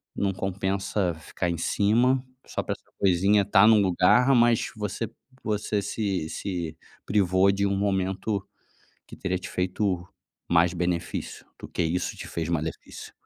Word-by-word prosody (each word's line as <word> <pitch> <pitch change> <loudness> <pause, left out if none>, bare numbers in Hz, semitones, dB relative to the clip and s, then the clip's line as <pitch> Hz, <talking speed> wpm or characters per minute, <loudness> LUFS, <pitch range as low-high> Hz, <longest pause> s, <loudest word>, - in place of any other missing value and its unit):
Não 100 -1 0
compensa 95 0 -1
ficar 80 +2 -4
em 85 - -3
cima 120 +9 +2 0.3
só - - -3
pra - - -2
essa - - -16
coisinha 100 +2 +4
estar 100 +1 +5
num 110 -1 +7
lugar 100 +8 +4
mas 120 -1 +3
você 105 +1 -3 0.4
você 105 -1 -1
se 100 -5 -2
se 85 -5 -4 0.3
privou 95 -1 +3
de 100 +1 0
um 100 - 0
momento 95 +1 -1 0.6
que - - -11
teria 95 -1 -2
te 90 - -8
feito 90 -1 -1 0.4
mais 85 0 +4
benefício 85 -1 -3
do - - -8
que - - -2
isso 85 +2 -1
te - - -8
fez 80 -1 -3
malefício. 80 -1 -4
95 Hz, 150 wpm, -26 LUFS, 90-105 Hz, 0.6 s, num